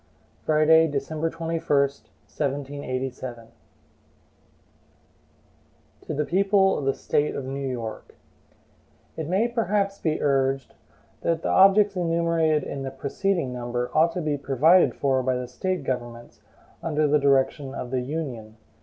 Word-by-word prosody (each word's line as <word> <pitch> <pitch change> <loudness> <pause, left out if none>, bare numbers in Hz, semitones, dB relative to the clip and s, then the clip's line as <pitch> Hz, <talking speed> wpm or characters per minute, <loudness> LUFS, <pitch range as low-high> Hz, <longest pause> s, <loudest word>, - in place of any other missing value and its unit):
Friday, 160 +1 +5
December 150 +3 -2
21, 165 0 -3
1787. 140 -2 -2
HAMILTON 115 0 -17 2.5
To - - -3
the 150 +1 0
People 195 +2 +3
of 140 - -4
the 135 - +2
State 150 +1 0
of 135 - -4
New 135 +1 -4
York: 115 -3 -6 1.0
IT 160 -2 -4
MAY 195 +7 +2
perhaps 205 -4 0
be 155 -2 -1
urged 135 -1 0 0.5
that 165 -1 -1
the - - -1
objects 195 +1 +5
enumerated 165 -3 +1
in 140 - -5
the 135 - -3
preceding 140 +2 -2
number 120 0 -3
ought 160 +2 +4
to 180 - -3
be 150 -3 -1
provided 150 +7 +4
for 135 -2 +1
by 130 0 0
the 125 0 -4
State 180 +7 -3
governments, 120 -2 -5 0.4
under 155 -2 +1
the 150 +1 +3
direction 140 0 +1
of 125 - -6
the 130 -1 0
Union. 125 -6 -5
145 Hz, 135 wpm, -25 LUFS, 130-165 Hz, 2.5 s, Friday